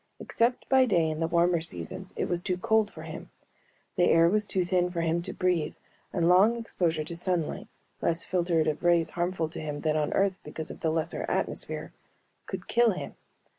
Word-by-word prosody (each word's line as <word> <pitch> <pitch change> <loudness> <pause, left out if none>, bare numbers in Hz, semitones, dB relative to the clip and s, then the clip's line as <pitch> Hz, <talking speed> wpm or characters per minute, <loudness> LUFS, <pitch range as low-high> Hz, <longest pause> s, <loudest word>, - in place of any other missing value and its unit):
Except 235 +2 0
by 265 -1 +5
day 170 -7 +3
in 155 - -4
the 165 - +1
warmer 170 0 +2
seasons 85 - -6
it - - 0
was 175 -1 -1
too 180 -1 -1
cold 220 +3 +2
for - - -10
him. - - -8 0.7
The 175 - +4
air 165 0 +6
was 210 +3 +1
too 185 -3 0
thin 180 0 +1
for 170 -2 -2
him 165 +1 +1
to - - -5
breathe 175 -4 0 0.4
and 170 -2 +1
long 195 +6 +5
exposure 170 -8 -1
to 165 +2 -6
sunlight 175 -2 -1 0.3
less 165 0 +1
filtered 170 -3 +1
of 155 -1 -1
rays 170 -2 +3
harmful 175 -1 -1
to - - -7
him 150 -1 -4
than 155 -1 +1
on 150 -1 0
Earth 195 -1 +2
because 155 +1 -5
of - - -10
the 160 - 0
lesser 160 0 -1
atmosphere - - -3 0.5
could - - -6
kill 235 -2 +3
him. - - -6
175 Hz, 200 wpm, -28 LUFS, 160-185 Hz, 0.7 s, air